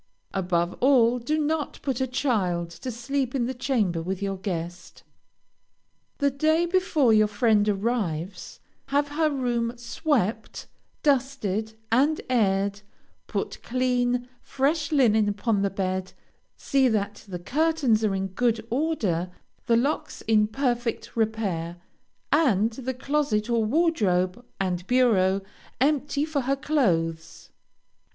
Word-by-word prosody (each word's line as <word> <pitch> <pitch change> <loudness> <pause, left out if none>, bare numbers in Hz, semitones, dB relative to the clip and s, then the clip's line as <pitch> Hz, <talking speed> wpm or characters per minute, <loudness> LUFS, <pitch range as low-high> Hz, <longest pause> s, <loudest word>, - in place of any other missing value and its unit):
Above 175 -2 0
all, 250 -2 +4
do 300 +7 -1
not 305 0 -1
put 265 -3 -1
a 260 - +1
child 190 -10 0
to 210 +9 -7
sleep 255 +2 -2
in 245 -3 +1
the 255 - -2
chamber 220 -10 0
with 185 +3 -3
your 195 -1 -2
guest. 175 -2 -6 1.1
The 280 0 +2
day 315 +5 +2
before 345 - +2
your 215 0 +5
friend 210 0 +2
arrives, 195 -5 -2 0.3
have 285 +1 +1
her 310 +2 +1
room 240 -4 -1
swept, 235 - -2 0.4
dusted, 240 - 0 0.2
and 285 +7 +3
aired; 200 -3 +1 0.5
put - - -4
clean, 245 0 0
fresh 290 +2 0
linen 220 -7 +4
upon 205 0 0
the 200 - +1
bed, 185 -1 -3 0.4
see 270 -2 +2
that 205 -3 -1
the 185 -2 -5
curtains 275 - +1
are 205 -3 +1
in 190 0 -2
good 225 +2 0
order, 230 - 0 0.4
the 230 - +4
locks 275 +6 -1
in 215 -1 +3
perfect 240 -1 -2
repair, 200 -7 -1 0.5
and 230 - +3
the 260 +2 -5
closet 260 -5 0
or 230 -1 +2
wardrobe 215 - +1 0.2
and 180 -1 -2
bureau 200 -7 +3 0.4
empty 290 +1 +1
for 310 -3 -1
her 270 +2 0
clothes. 165 - -1
235 Hz, 125 wpm, -25 LUFS, 195-275 Hz, 1.1 s, your